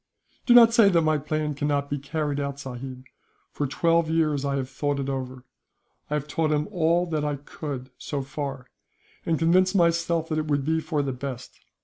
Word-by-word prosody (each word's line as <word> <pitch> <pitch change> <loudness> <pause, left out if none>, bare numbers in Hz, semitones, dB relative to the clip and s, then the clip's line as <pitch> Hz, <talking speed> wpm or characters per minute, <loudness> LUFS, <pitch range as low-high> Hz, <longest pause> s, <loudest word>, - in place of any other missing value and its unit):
"Do 240 - +7
not 230 -1 +8
say 225 -4 +6
that 170 -3 +3
my 155 -1 +2
plan 150 +1 -2
cannot 145 0 -1
be 145 0 -3
carried 145 0 -2
out, 140 0 -3
sahib. 130 -1 -7 0.5
For 145 - -2
twelve 165 +3 +2
years 155 -3 +1
I 140 -1 -1
have 135 -2 -2
thought 140 +2 -2
it 135 0 -2
over. 130 -1 -5 0.7
I 150 - 0
have 150 -1 -3
taught 155 +1 0
him 150 0 +1
all 170 -1 +2
that 155 -2 0
I 150 -1 -1
could, 140 -2 -7
so 140 -2 -3
far; 135 -1 -5 0.6
and 165 -1 +2
convinced 185 +4 +3
myself 170 -2 +2
that 155 -1 0
it 155 - -3
would 145 -2 0
be 160 +1 +1
the 145 -3 -1
best. 125 -1 -7
150 Hz, 195 wpm, -25 LUFS, 140-165 Hz, 0.7 s, not